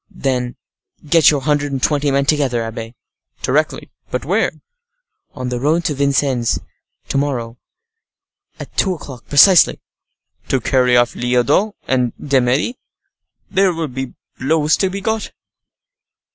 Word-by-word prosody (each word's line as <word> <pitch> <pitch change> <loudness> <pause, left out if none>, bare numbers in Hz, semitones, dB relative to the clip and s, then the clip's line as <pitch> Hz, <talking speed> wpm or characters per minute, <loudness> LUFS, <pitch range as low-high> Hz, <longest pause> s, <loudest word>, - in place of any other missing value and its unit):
"Then 130 -9 -2 0.5
get 165 +1 +6
your 145 -2 +1
hundred 145 0 0
and 135 -2 -3
twenty 145 -1 +1
men 140 0 +1
together, 135 -6 +1
abbe." 115 +1 -7 0.5
"Directly. - - -1 0.2
But - - -3
where?" - - +1 0.8
"On 130 -2 -4
the 125 -1 -3
road 155 +5 +1
to 150 - 0
Vincennes, 135 -3 +1 0.5
to - - 0
morrow, 120 -5 -3 1.0
at - - -10
two 190 -2 +1
o'clock 135 -6 -11
precisely." 170 +5 +6 0.7
"To 135 - +1
carry 125 0 +2
off 120 -1 +2
Lyodot 125 - +1
and 125 -2 +1
D'Eymeris? 135 - +1 0.8
There 190 -2 +2
will 160 -2 -3
be 130 0 -6 0.2
blows 150 +3 +2
to 190 - +1
be 195 +2 -5
got!" 220 +1 -2
140 Hz, 130 wpm, -18 LUFS, 125-155 Hz, 1.0 s, get